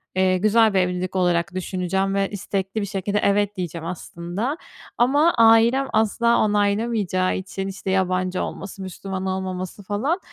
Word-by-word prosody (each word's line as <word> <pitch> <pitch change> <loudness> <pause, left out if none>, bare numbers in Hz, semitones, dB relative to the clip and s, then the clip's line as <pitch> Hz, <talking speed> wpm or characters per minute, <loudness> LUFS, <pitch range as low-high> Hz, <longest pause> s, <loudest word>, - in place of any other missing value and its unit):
eee, 185 0 +3
güzel 215 +2 +4
bir 190 - +3
evlilik 180 +1 -1
olarak 175 0 +1
düşüneceğim 190 +1 -1
ve 195 0 +1
istekli 195 +1 -3
bir - - -1
şekilde 200 +2 -1
evet, 205 0 +1
diyeceğim 170 -2 -4
aslında. 180 - -4 0.4
Ama 290 +7 +4
ailem 230 +4 +5
asla 235 +2 +2
onaylamayacağı 205 -2 +1
için, 195 +1 -5
işte, 195 0 -4
yabancı 185 -1 0
olması, 195 0 -7
Müslüman 190 +1 -5
olmaması, 185 +1 -4
falan, 255 - -1
195 Hz, 140 wpm, -22 LUFS, 185-215 Hz, 0.4 s, ailem